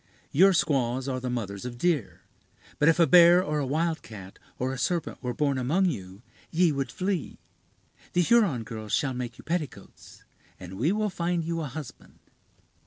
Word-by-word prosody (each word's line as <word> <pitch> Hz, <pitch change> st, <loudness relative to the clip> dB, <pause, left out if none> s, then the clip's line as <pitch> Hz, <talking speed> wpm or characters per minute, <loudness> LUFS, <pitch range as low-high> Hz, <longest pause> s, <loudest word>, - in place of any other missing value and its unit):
Your 190 Hz, +7 st, +6 dB
squaws 135 Hz, -6 st, 0 dB
are 130 Hz, -1 st, -2 dB
the 125 Hz, 0 st, -4 dB
mothers 100 Hz, -5 st, -4 dB
of 120 Hz, -1 st, -6 dB
deer; 120 Hz, -, -1 dB, 0.6 s
but 150 Hz, -, +5 dB
if 165 Hz, -, +2 dB
a 170 Hz, -, +7 dB
bear, 175 Hz, +1 st, +7 dB
or 150 Hz, -2 st, -1 dB
a 140 Hz, -, -1 dB
wildcat, 140 Hz, -, -3 dB, 0.2 s
or 130 Hz, +1 st, -2 dB
a -, -, -5 dB
serpent 170 Hz, +6 st, -2 dB
were 125 Hz, -1 st, -2 dB
born 140 Hz, -3 st, 0 dB
among 160 Hz, +10 st, +1 dB
you, 95 Hz, 0 st, -9 dB, 0.3 s
ye 170 Hz, 0 st, +3 dB
would 140 Hz, -2 st, -3 dB
flee. 185 Hz, -4 st, -3 dB, 0.8 s
The 180 Hz, -, +3 dB
Huron 185 Hz, -, +3 dB
girls 110 Hz, -2 st, -7 dB
shall 140 Hz, -4 st, +1 dB
make 125 Hz, -1 st, -5 dB
you -, -, -13 dB
petticoats, 155 Hz, -3 st, -6 dB, 0.4 s
and 90 Hz, +1 st, -9 dB
we 150 Hz, +9 st, +2 dB
will 210 Hz, 0 st, 0 dB
find 170 Hz, -1 st, -1 dB
you 165 Hz, 0 st, -2 dB
a 150 Hz, -, -3 dB
husband." 140 Hz, -1 st, -10 dB
145 Hz, 175 wpm, -27 LUFS, 120-170 Hz, 0.8 s, a